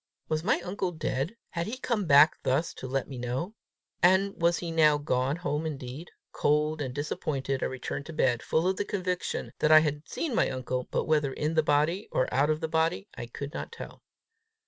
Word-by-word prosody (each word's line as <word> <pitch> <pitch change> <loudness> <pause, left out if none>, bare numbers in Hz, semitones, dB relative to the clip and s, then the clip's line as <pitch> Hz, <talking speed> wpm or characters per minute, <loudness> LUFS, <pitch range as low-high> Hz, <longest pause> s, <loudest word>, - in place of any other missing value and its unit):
Was 155 0 0
my 205 - +2
uncle 185 0 -2
dead? 155 - -2 0.2
Had 170 0 -2
he 240 +4 -4
come 235 -6 -1
back 145 +2 +6
thus 145 +6 0
to 130 - -7
let 135 0 -1
me 135 -3 -7
know? 125 - -3 0.5
And 190 +3 +4
was 170 0 +2
he 170 -2 -4
now 155 -2 +5
gone 135 -1 0
home 155 -3 -2
indeed? 145 +1 -6 0.2
Cold 150 +1 +1
and 130 -3 -2
disappointed, 135 -1 -2
I - - +1
returned 130 +2 -5
to 165 - -7
bed, 125 -5 +2
full 160 +3 +1
of 190 0 +1
the - - 0
conviction 185 -3 -2
that 155 - +3
I 155 0 +9
had 150 -1 -2
seen 320 -6 -2
my - - +2
uncle, 130 -1 -3
but - - -1
whether 150 -3 +2
in 150 +4 -2
the 160 - +4
body 155 +6 +1
or 130 - +1
out 140 +4 +3
of 155 0 0
the - - -1
body, 160 - 0
I 120 - -6
could 140 +5 -7
not - - -5
tell. 465 - -9
155 Hz, 210 wpm, -28 LUFS, 135-170 Hz, 0.5 s, I